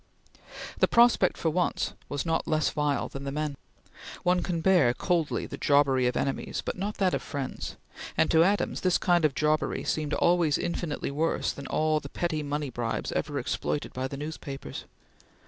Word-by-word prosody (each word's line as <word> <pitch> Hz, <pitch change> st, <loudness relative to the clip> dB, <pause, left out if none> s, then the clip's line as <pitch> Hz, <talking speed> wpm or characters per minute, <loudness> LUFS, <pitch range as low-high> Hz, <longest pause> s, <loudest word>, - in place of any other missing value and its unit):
The -, -, +5 dB
prospect 235 Hz, -5 st, +4 dB
for 160 Hz, -, 0 dB
once 180 Hz, +2 st, 0 dB, 0.2 s
was 145 Hz, +2 st, -2 dB
not 165 Hz, -1 st, 0 dB
less 155 Hz, -1 st, +1 dB
vile 150 Hz, -1 st, 0 dB
than 135 Hz, -, -7 dB
the 140 Hz, -, -3 dB
men. 150 Hz, 0 st, -2 dB, 0.7 s
One 180 Hz, 0 st, +3 dB
can 175 Hz, -3 st, -2 dB
bear 160 Hz, -9 st, +4 dB
coldly 170 Hz, -1 st, 0 dB
the -, -, -8 dB
jobbery 140 Hz, -3 st, +3 dB
of 125 Hz, -, 0 dB
enemies, 135 Hz, -, -2 dB
but -, -, -2 dB
not 205 Hz, +3 st, -3 dB
that 185 Hz, -2 st, +2 dB
of -, -, 0 dB
friends, 140 Hz, -3 st, -5 dB, 0.4 s
and -, -, +3 dB
to 160 Hz, 0 st, +6 dB
Adams 200 Hz, +3 st, +1 dB
this 185 Hz, -1 st, +3 dB
kind 175 Hz, -3 st, +3 dB
of 145 Hz, -3 st, +1 dB
jobbery 155 Hz, 0 st, +1 dB
seemed 155 Hz, -1 st, -1 dB
always 170 Hz, -4 st, +3 dB
infinitely 170 Hz, -4 st, -3 dB
worse 160 Hz, +4 st, 0 dB
than 140 Hz, -, -8 dB
all 155 Hz, 0 st, +1 dB
the 140 Hz, -, -9 dB
petty 160 Hz, -2 st, -2 dB
money 145 Hz, -1 st, -3 dB
bribes 120 Hz, -1 st, -2 dB
ever 145 Hz, -1 st, -2 dB
exploited 135 Hz, +2 st, -2 dB
by 130 Hz, +1 st, -2 dB
the 140 Hz, -, -7 dB
newspapers. 145 Hz, -2 st, -6 dB
155 Hz, 180 wpm, -28 LUFS, 140-175 Hz, 0.7 s, to